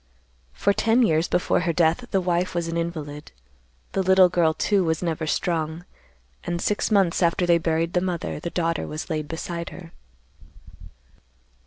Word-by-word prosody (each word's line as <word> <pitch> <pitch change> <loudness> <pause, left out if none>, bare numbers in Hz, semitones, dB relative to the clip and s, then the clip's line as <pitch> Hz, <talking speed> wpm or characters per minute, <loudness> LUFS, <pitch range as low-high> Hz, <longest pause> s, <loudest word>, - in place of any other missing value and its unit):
"For 200 - +1
ten 230 +4 +3
years 160 -5 +2
before 180 - +1
her 170 -1 0
death 170 +9 +1
the 195 - +1
wife 175 0 -1
was 170 -1 -1
an 165 - -3
invalid. 155 -3 -5 0.6
The 195 - 0
little 190 -1 +5
girl, 170 -3 +2
too, 200 -2 +1
was 160 0 -1
never 160 -2 -2
strong, 160 +1 -2 0.6
and 175 0 -3
six 205 +4 0
months 195 -6 +2
after 170 +1 +2
they 170 -1 +4
buried 165 +1 -1
the 180 - +2
mother 175 -4 -3
the 170 - -4
daughter 165 -2 -1
was 155 +3 -6
laid 155 -1 -2
beside 170 +1 -5
her. 170 -2 -11
170 Hz, 165 wpm, -24 LUFS, 160-180 Hz, 0.6 s, little